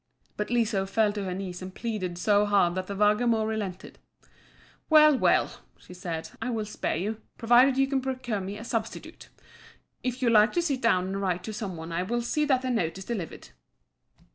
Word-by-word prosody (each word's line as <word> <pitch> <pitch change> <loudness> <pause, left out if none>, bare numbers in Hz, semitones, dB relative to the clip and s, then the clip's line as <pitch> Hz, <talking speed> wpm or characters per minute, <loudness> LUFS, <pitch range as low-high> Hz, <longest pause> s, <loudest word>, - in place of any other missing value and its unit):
But 210 0 -3
Liso 220 -5 +1
fell 215 +2 +2
on 205 -2 -3
her 185 - -3
knees 185 -2 -6
and 185 0 -8
pleaded 200 -7 -3
so 205 +3 +3
hard 195 -4 +3
that 185 0 -4
the 200 - -5
Vargamor 215 +2 +2
relented, 205 -4 -5 0.9
"Well, 305 -2 +7
well!" - - +2 0.2
she - - -14
said, 170 -3 -5
"I 230 - -2
will 225 -3 -2
spare 210 - -3
you, 210 +6 -3 0.2
provided 245 +3 +5
you 270 - +4
can 270 -1 -1
procure 250 -5 -3
me 195 +2 -5
a 215 - -8
substitute. 230 -2 -5 0.7
If 250 0 -3
you 235 - +3
like 215 0 +5
to 345 - +2
sit 275 -6 -1
down 185 -6 +3
and 195 +1 -3
write 180 -2 -1
to 220 - -5
some 200 -5 -5
one 160 +1 -7
I 170 +1 -1
will 235 +6 -2
see 300 +5 0
that 265 -3 +2
the 255 - -1
note 185 -8 -1
is 190 - -8
delivered." 195 - -5
210 Hz, 200 wpm, -27 LUFS, 185-240 Hz, 0.9 s, Well